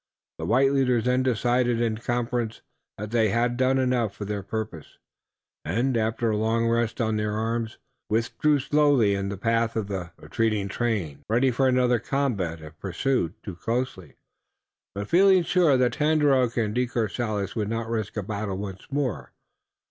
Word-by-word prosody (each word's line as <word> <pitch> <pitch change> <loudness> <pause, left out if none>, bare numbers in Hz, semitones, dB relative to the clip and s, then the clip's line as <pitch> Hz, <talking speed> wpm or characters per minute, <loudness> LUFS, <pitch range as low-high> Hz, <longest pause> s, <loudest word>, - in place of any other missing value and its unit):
The - - -3
white 135 +4 +4
leaders 125 -4 +2
then 125 +1 +2
decided 120 -1 +1
in 115 -2 0
conference 120 -1 -2 0.3
that 105 +1 -6
they 115 -2 +3
had 120 +3 +1
done 130 +1 +2
enough 125 -5 +1
for 105 - -6
their 100 0 -3
purpose, 105 -5 -6 0.7
and, 120 +9 0
after 115 +1 0
a 105 - 0
long 115 +2 +1
rest 115 +1 0
on 110 -2 +1
their 105 0 -1
arms, 115 +1 -2 0.3
withdrew 115 +7 +1
slowly 140 -6 +3
in 100 0 -2
the 100 - -4
path 115 +2 0
of 105 -3 -2
the 95 -3 -4
retreating 110 -3 -1
train, 95 -12 -2
ready 125 +4 +3
for 130 +3 +2
another 125 -2 +3
combat, 105 - -2
if 75 0 -12
pursued 95 0 -1
too 100 - -6
closely, 115 - -3 0.8
but 100 +1 -4
feeling 190 - +5
sure 165 -6 +3
that 125 -1 +2
Tandakora 150 -5 +3
and 110 -3 0
De 125 +1 +1
Courcelles 110 -3 -2
would 105 -3 -1
not 115 0 -2
risk 110 -2 -3
a 105 - -1
battle 100 -1 -3
once 95 -2 -7
more. 135 -6 -2
115 Hz, 165 wpm, -25 LUFS, 105-125 Hz, 0.8 s, feeling